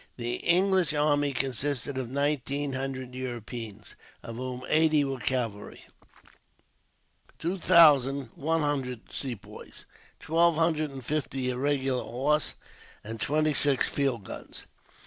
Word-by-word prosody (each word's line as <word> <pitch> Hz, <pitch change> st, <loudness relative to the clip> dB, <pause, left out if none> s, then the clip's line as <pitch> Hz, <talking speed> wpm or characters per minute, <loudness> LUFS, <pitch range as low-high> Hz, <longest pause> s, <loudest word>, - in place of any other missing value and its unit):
The 120 Hz, 0 st, -2 dB
English 185 Hz, -2 st, +3 dB
army 145 Hz, -1 st, +2 dB
consisted 135 Hz, +1 st, -1 dB
of 130 Hz, -3 st, -3 dB
nineteen 140 Hz, 0 st, 0 dB
hundred 130 Hz, -1 st, -4 dB
Europeans, 120 Hz, -4 st, -6 dB, 0.3 s
of 115 Hz, 0 st, -7 dB
whom 125 Hz, 0 st, -5 dB
eighty 155 Hz, -1 st, +4 dB
were 135 Hz, -2 st, -3 dB
cavalry, 115 Hz, -6 st, -3 dB, 1.5 s
two 180 Hz, +4 st, -3 dB
thousand 140 Hz, -8 st, +5 dB
one 160 Hz, +3 st, 0 dB
hundred 135 Hz, -5 st, -2 dB
Sepoys, 125 Hz, -7 st, -7 dB, 0.3 s
twelve 170 Hz, +1 st, +3 dB
hundred 160 Hz, -2 st, +1 dB
and 135 Hz, -3 st, -9 dB
fifty 135 Hz, -3 st, -1 dB
irregular 135 Hz, 0 st, 0 dB
horse, 140 Hz, +6 st, 0 dB, 0.5 s
and 110 Hz, +1 st, -7 dB
twenty 155 Hz, +1 st, +2 dB
six 140 Hz, -2 st, +3 dB
field 135 Hz, -6 st, -1 dB
guns. -, -, -8 dB
135 Hz, 115 wpm, -28 LUFS, 125-150 Hz, 1.5 s, thousand